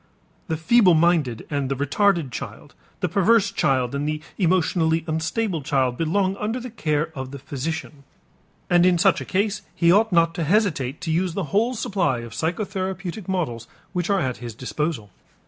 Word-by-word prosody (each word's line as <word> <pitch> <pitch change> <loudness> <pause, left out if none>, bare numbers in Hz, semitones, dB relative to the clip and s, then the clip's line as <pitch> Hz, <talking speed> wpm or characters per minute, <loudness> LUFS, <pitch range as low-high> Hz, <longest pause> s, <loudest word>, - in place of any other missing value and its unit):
The 160 - -1
feeble 180 +2 +5
minded 155 -8 +2
and 140 -2 -1
the 135 - 0
retarded 155 +2 +1
child, - - -8 0.3
the - - +1
perverse 200 0 +3
child 130 -6 +1
and 140 +1 -2
the 155 0 -2 0.2
emotionally 165 -3 +2
unstable 165 +3 -1
child, 135 -3 +1
belong 190 +6 0
under 220 +5 -2
the 250 -1 -7
care 155 -7 -1
of 130 -2 -6
the 140 - -7
physician, 145 +1 -5 0.6
and 175 -1 +4
in 180 -1 +4
such 195 +2 +3
a - - -6
case 200 +1 0
he 170 -1 +4
ought 215 +3 +4
not 170 -1 +3
to 165 - -2
hesitate 155 - +1
to 170 -3 -2
use 175 +1 0
the 195 - -1
whole 230 +5 +2
supply 185 - 0
of 115 -1 -9
psychotherapeutic 185 +2 -3
methods 145 - -2 0.3
which 180 -1 -1
are 200 -1 +3
at 130 -2 -2
his 120 -2 -8
disposal. 125 - -3
165 Hz, 175 wpm, -23 LUFS, 140-195 Hz, 0.6 s, feeble